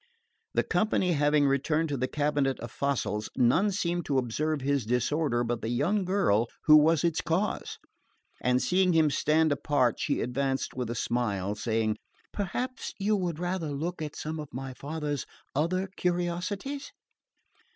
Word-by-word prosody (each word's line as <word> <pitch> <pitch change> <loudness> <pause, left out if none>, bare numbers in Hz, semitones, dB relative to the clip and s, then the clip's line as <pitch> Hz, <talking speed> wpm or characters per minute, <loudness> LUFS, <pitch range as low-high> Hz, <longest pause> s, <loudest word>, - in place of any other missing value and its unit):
The - - +3
company 210 -4 +1
having 145 -1 +3
returned 150 +4 +1
to 145 - -1
the 130 +1 0
cabinet 145 -2 0
of 120 -1 -6
fossils, 115 -6 -1
none 145 - +4
seemed 175 -3 -1
to 140 - 0
observe 145 +5 0
his 140 -1 +1
disorder 125 +2 +1
but 120 -1 -2
the 110 - -3
young 185 - +1
lady 175 - +2 0.2
who 155 - +8
was 160 +1 +4
its 165 -2 +1
cause; 175 +5 -1 0.6
and 125 0 +3
seeing 185 0 +3
him 160 -2 +4
stand 155 +2 +2
apart 145 -3 +1
she - - 0
advanced 135 +2 -1
with 125 -3 -3
a 120 - -3
smile, 105 -5 -1
saying, 110 0 0 0.4
"Perhaps 245 +6 -3
you 210 +1 +1
would 175 -5 -2
rather 175 -2 -2
look 160 +4 -3
at 150 -2 -5
some 155 +1 -4
of 150 -2 -7
my 130 +1 -5
father's 145 +1 -4 0.3
other 185 +6 +1
curiosities." 180 +10 -2
150 Hz, 155 wpm, -28 LUFS, 125-175 Hz, 0.6 s, who